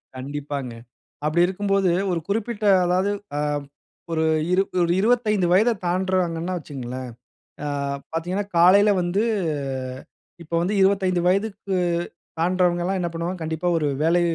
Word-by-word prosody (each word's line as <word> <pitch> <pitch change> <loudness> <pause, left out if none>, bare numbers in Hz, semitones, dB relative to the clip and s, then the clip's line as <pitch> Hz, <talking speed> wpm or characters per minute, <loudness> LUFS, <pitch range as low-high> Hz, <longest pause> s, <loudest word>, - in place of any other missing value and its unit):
கண்டிப்பாங்க. 140 -1 -5 0.5
அப்படி 170 +3 +3
இருக்கும்போது 195 0 +1 0.2
ஒரு 170 - 0
குறிப்பிட்ட 215 +1 -2 0.2
அதாவது 185 +3 +1 0.3
அ - - 0 0.7
ஒரு 160 -1 +1 0.3
இரு 190 +1 +4 0.2
ஒரு 170 0 +2
25 215 -5 +2
வயதை 220 +6 +5
தாண்டுறாங்கனா 180 -1 0
வைச்சுக்கோங்களேன், 130 -4 -6 0.6
ஆ - - -2 0.5
பார்த்தீங்கனா 180 +5 -1
காலையில 200 +5 +6
வந்து 175 +4 0 1.2
இப்போ 165 +1 -4
வந்து 190 +4 0
25 190 -2 +3
வயதுக்கு, 195 0 0 0.6
தாண்டுறவங்கல்லாம் 180 +1 +1
என்ன 175 - -1
பண்ணுவாங்க, 170 +2 -3
கண்டிப்பா 160 +2 -2
ஒரு 150 -2 0 0.2
வேலை 170 +2 +3
180 Hz, 115 wpm, -23 LUFS, 165-195 Hz, 1.2 s, காலையில